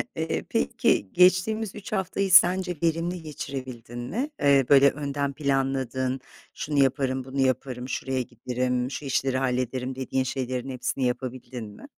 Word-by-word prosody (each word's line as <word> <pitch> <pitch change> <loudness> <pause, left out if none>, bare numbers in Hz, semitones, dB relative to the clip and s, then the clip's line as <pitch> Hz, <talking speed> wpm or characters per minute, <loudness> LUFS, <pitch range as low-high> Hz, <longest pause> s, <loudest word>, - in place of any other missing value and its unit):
Eee, - - -2
peki, 95 - +1
geçtiğimiz 185 +4 +3
3 205 - -9
haftayı 195 -1 -1
sence 180 0 +6
verimli 165 +2 0
geçirebildin 130 -6 -7
mi? 230 - -3
Eee, 140 -2 +5
böyle, 140 0 +7
önden 140 -1 -3
planladığın, 135 -2 -1 0.3
"Şunu 145 -1 -2
yaparım, 130 -1 0
bunu 135 +1 -5
yaparım, 130 -1 -1
şuraya 130 -1 -1
giderim, 125 +1 -2
şu 145 - -5
işleri 135 0 0
hallederim," 130 0 -1
dediğin 130 0 -1
şeylerin 130 0 -3
hepsini 130 +1 -2
yapabildin 125 -1 -4
mi? 105 0 -12
135 Hz, 135 wpm, -26 LUFS, 125-150 Hz, 0.3 s, böyle